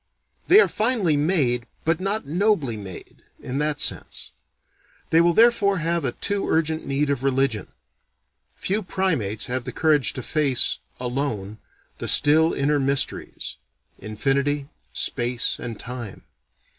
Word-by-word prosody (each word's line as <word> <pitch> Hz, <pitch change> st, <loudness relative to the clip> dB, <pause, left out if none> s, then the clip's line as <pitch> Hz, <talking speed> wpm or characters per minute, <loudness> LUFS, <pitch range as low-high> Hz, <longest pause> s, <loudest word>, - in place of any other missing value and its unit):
They 390 Hz, -, +8 dB
are -, -, +6 dB
finely 215 Hz, -8 st, +1 dB
made, 145 Hz, -6 st, +1 dB, 0.2 s
but 165 Hz, +1 st, +1 dB
not 195 Hz, +1 st, -2 dB
nobly 165 Hz, -, +1 dB
made, 95 Hz, -4 st, -10 dB, 0.2 s
in 130 Hz, +2 st, -4 dB
that 150 Hz, 0 st, -1 dB
sense. -, -, -1 dB, 0.8 s
They 165 Hz, -, +5 dB
will 170 Hz, 0 st, +3 dB
therefore 225 Hz, -4 st, +4 dB
have 170 Hz, -1 st, -1 dB
a 125 Hz, -, -1 dB
too 200 Hz, -1 st, -2 dB
urgent 160 Hz, 0 st, 0 dB
need 140 Hz, +1 st, 0 dB
of 140 Hz, -3 st, -1 dB
religion. 135 Hz, -5 st, 0 dB, 0.9 s
Few 205 Hz, +3 st, -1 dB
primates 165 Hz, -, -1 dB
have 125 Hz, 0 st, -3 dB
the 125 Hz, -, -6 dB
courage 145 Hz, -6 st, +2 dB
to 130 Hz, -, -6 dB
face 140 Hz, -4 st, +1 dB, 0.2 s
alone 120 Hz, -5 st, -3 dB, 0.4 s
the -, -, -4 dB
still 160 Hz, +3 st, +6 dB
inner 145 Hz, +1 st, +1 dB
mysteries: 135 Hz, 0 st, -1 dB, 0.4 s
Infinity, 140 Hz, +7 st, -1 dB, 0.2 s
Space 120 Hz, -1 st, 0 dB
and 115 Hz, -3 st, -6 dB
Time. 120 Hz, -4 st, -8 dB
145 Hz, 130 wpm, -23 LUFS, 125-165 Hz, 0.9 s, They